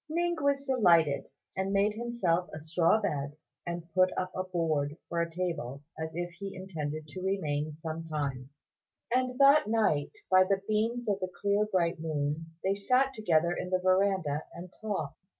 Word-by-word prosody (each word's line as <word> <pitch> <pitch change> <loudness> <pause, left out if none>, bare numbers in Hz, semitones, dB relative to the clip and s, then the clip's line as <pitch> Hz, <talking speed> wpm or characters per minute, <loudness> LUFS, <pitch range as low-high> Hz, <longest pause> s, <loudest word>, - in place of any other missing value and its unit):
Ning 345 +2 +1
was 280 -1 +2
delighted, 170 - +4 0.3
and 190 +1 -1
made 200 +1 +3
himself 210 -7 0
a - - -6
straw 165 +6 +2
bed, 145 -8 -2 0.3
and 170 -1 -4
put 185 +1 +5
up 185 0 -1
a 185 - -1
board 160 -5 -1
for 170 0 -1
a 170 - -1
table, 165 -6 -3
as 160 0 -4
if 175 0 -3
he 195 +3 -7
intended 155 -5 -5
to 185 +4 -7
remain 155 -6 -1
some 160 0 -5
time; 140 -5 -3 0.6
and 255 0 +1
that 275 -2 +6
night, 215 -10 +2 0.2
by 185 0 +7
the 195 +1 0
beams 230 +3 0
of 200 -2 +1
the 185 -1 -3
clear 205 +2 +2
bright 170 -2 +1
moon, 155 0 -2 0.2
they 190 - +2
sat 255 +7 +2
together 175 -7 +2
in 180 - -4
the 185 - +2
verandah 185 -5 +1
and 175 +1 -9
talked. 175 -9 -3
180 Hz, 170 wpm, -30 LUFS, 160-205 Hz, 0.6 s, by